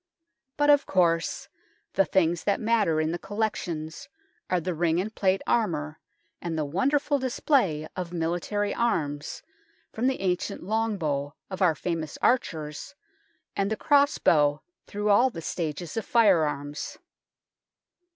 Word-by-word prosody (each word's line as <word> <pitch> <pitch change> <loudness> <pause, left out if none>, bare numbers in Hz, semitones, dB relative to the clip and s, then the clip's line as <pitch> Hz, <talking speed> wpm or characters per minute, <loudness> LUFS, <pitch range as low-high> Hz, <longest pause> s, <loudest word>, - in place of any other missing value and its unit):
But, 290 0 +5
of 285 -1 +4
course, 165 -3 +1 0.5
the 195 - +3
things 175 -3 +1
that 200 - +2
matter 215 -8 +2
in 155 0 0
the 175 - -3
collec 210 +2 -1
tions 160 -2 -6 0.4
are 180 - +2
the 180 +2 -3
ring 165 +1 +1
and 210 +4 -3
plate 190 -2 +1
armour 155 -9 0 0.4
and 170 -2 -3
the 155 - 0
wonderful 280 - +1
display 240 - +1
of 180 -2 -4
military 175 +5 -1
arms, 150 -11 -1 0.5
from 235 +3 0
the 265 -5 0
ancient 180 -2 -1
long 220 +2 0
bow 145 -4 -2 0.2
of 190 +1 -5
our 175 -4 +4
famous 160 -1 -3
archers 160 - -1 0.6
and 195 0 0
the 220 - -1
cross 285 -1 +3
bow 145 -2 +3 0.2
through 210 0 -2
all 240 +6 +5
the 235 - -8
stages 165 -1 -4
of 225 - -1
fire 200 -9 +4
arms. 145 0 -5
180 Hz, 145 wpm, -27 LUFS, 155-220 Hz, 0.6 s, But